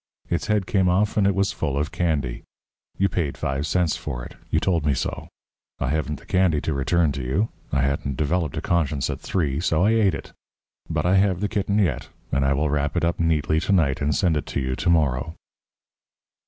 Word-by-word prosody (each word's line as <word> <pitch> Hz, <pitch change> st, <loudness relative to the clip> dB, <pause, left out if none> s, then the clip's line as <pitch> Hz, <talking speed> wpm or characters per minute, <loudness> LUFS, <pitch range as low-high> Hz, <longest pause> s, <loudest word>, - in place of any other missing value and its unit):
Its 85 Hz, -, -1 dB
head 105 Hz, -3 st, +1 dB
came 95 Hz, -1 st, +2 dB
off 100 Hz, +4 st, +2 dB
and 100 Hz, -2 st, +3 dB
it 100 Hz, -, +2 dB
was 100 Hz, 0 st, +1 dB
full 70 Hz, -4 st, -2 dB
of 75 Hz, +3 st, -1 dB
candy. 70 Hz, -8 st, -1 dB, 0.6 s
You 95 Hz, -, +3 dB
paid 80 Hz, -7 st, -2 dB
five 70 Hz, +2 st, -2 dB
cents 85 Hz, -1 st, +1 dB
for -, -, -5 dB
it -, -, -10 dB, 0.2 s
you -, -, +2 dB
told 85 Hz, -5 st, +1 dB
me 75 Hz, -2 st, +2 dB
so. -, -, -3 dB, 0.5 s
I 65 Hz, -, -2 dB
haven't 75 Hz, -1 st, -1 dB
the -, -, -18 dB
candy 90 Hz, -5 st, +2 dB
to 80 Hz, -, -1 dB
return 75 Hz, +3 st, +2 dB
to 70 Hz, -, -4 dB
you 80 Hz, -, 0 dB, 0.2 s
I 70 Hz, -, +1 dB
hadn't 70 Hz, -1 st, -1 dB
developed 75 Hz, +1 st, 0 dB
a -, -, -1 dB
conscience 75 Hz, -5 st, 0 dB
at -, -, -5 dB
three, 75 Hz, -7 st, -1 dB
so 80 Hz, 0 st, +1 dB
I 105 Hz, -, +4 dB
ate 105 Hz, -7 st, +3 dB
it. -, -, -9 dB, 0.6 s
But -, -, -1 dB
I 95 Hz, +2 st, +4 dB
have 95 Hz, -2 st, +2 dB
the 105 Hz, -, 0 dB
kitten 100 Hz, -1 st, 0 dB
yet, 100 Hz, -6 st, 0 dB, 0.2 s
and 70 Hz, 0 st, +1 dB
I 70 Hz, +1 st, +3 dB
will 75 Hz, +1 st, 0 dB
wrap 70 Hz, 0 st, 0 dB
it -, -, +2 dB
up 85 Hz, -, -1 dB
neatly 80 Hz, -1 st, +2 dB
to 85 Hz, -, -1 dB
night 80 Hz, -7 st, +2 dB
and 75 Hz, +1 st, +1 dB
send 90 Hz, -6 st, +2 dB
it 75 Hz, -, -2 dB
to -, -, -2 dB
you 65 Hz, -1 st, -1 dB
to -, -, -1 dB
morrow." 75 Hz, -2 st, +1 dB
80 Hz, 220 wpm, -24 LUFS, 70-90 Hz, 0.6 s, I